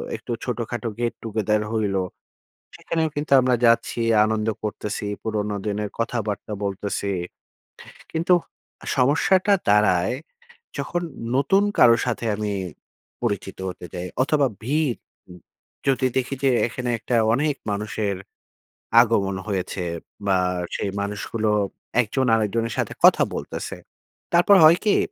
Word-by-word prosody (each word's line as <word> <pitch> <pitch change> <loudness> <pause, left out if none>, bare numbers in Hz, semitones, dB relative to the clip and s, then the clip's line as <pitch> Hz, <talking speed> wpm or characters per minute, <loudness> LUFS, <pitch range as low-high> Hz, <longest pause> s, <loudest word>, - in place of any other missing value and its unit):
একটু - - -8
ছোটখাটো 120 -1 -3
get 120 -1 0
together 105 -1 0
হইলো। 100 -4 0 0.8
সেখানেও 160 -1 -1
কিন্তু 145 0 -3
আমরা 125 0 +2
যাচ্ছি, 115 0 +2 0.2
আনন্দ 110 0 0 0.2
করতেছি, 105 0 -4 0.2
পুরনো 105 -2 -2
দিনের 105 0 -2
কথাবার্তা 110 -3 -2
বলতেছি। 100 0 -2 1.0
কিন্তু 170 +3 +2 0.6
সমস্যাটা 180 +9 +3 0.2
দাঁড়ায়, 100 -2 +3 0.7
যখন 175 0 -2 0.3
নতুন 190 +9 +3 0.2
কারো 115 -1 +7
সাথে 120 -1 -2
আমি 105 -1 -2 0.7
পরিচিত 100 -4 -2
হতে 90 -1 -7
যাই। 90 0 -4 0.2
অথবা, 145 +1 +2 0.2
ভিড় 140 +2 +1 0.4
উ - - -9 0.6
যদি 130 -1 +2
দেখি 130 +1 0
যে, 135 - +4 0.2
এখানে 125 +1 -5
একটা 120 +2 -1 0.2
অনেক 145 +3 +1 0.2
মানুষের 105 -1 -2 0.8
আগমন 105 -5 +2
হয়েছে। 95 -1 -2 0.4
বা, 95 -1 +3 0.4
সেই 100 - -2
মানুষগুলো 105 +2 -2 0.5
একজন 130 +4 -1
আরেকজনের 115 +1 0
সাথে - - -1
কথা - - +7
বলতেছে। - - -5 0.6
তারপর 175 +4 +6
হয় 165 +3 +8
কি? 210 - +4
115 Hz, 115 wpm, -23 LUFS, 105-130 Hz, 1.0 s, হয়